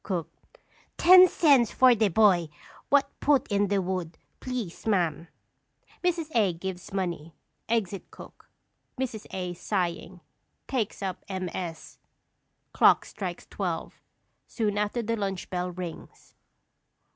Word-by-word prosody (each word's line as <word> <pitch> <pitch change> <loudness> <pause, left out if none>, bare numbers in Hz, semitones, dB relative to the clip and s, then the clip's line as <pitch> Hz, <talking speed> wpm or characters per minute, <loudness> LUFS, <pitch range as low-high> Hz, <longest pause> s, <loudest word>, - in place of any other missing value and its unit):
_ - - -51
Cook. 180 -5 -3 0.7
Ten 365 +1 +9
cents 280 -10 +4
for 255 -1 +6
de 220 -2 +2
boy 185 -4 +3 0.4
what 280 -1 +3
put 285 -3 +2
in 200 0 +2
de 200 0 +1
wood, 180 -3 -3 0.2
please, 240 -8 -5
ma'am! 175 -6 0 0.8
[_Mrs. 335 -3 -1
A. 205 -6 +3
gives 180 +1 -7
money; 175 -5 -4 0.3
exit 205 -5 -1
cook. - - -14 0.5
Mrs. 235 -5 -4
A., 180 -2 -4
sighing, 175 -1 -3 0.5
takes 225 -6 -2
up 190 -2 -4
MS. 180 -3 -5 0.7
Clock - - +5
strikes - - -6
twelve; - - -5 0.5
soon 210 -3 -1
after 210 +3 -1
the 230 +1 -1
lunch 195 -4 -4
bell 180 0 -2
rings. 180 -2 -9
195 Hz, 120 wpm, -27 LUFS, 180-230 Hz, 0.8 s, Ten